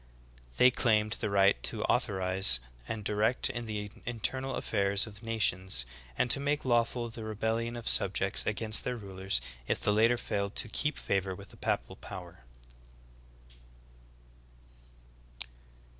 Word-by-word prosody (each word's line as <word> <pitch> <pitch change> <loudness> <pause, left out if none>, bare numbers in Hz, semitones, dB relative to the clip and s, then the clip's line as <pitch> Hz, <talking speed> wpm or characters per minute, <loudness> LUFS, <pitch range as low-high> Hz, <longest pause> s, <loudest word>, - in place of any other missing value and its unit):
"^ - - -21
They 125 - +7
claimed 110 -4 +2
the - - -2
right 100 -10 +4
to - - -2
authorize 95 -8 +2 0.3
and 110 -2 -4
direct 105 +4 +1
in 120 -1 -5
the 105 -1 -4
internal 130 +3 -2
affairs 100 -1 +1
of 105 -1 -11
nations, 95 - +1 0.3
and 120 - +2
to - - +5
make 145 +1 0
lawful 120 -1 +1
the 115 0 -8
rebellion 110 +2 -1
of 120 -1 -6
subjects - - +3
against 110 -1 0
their 125 -1 -2
rulers 95 - -2 0.3
if - - +1
the 105 - +3
latter 115 +3 +4
failed 100 -3 -2
to - - +1
keep 150 +6 0
favor 95 -1 -1
with 100 +1 -12
the - - -14
papal - - -2
power. 85 -7 -9
110 Hz, 140 wpm, -31 LUFS, 100-115 Hz, 0.3 s, They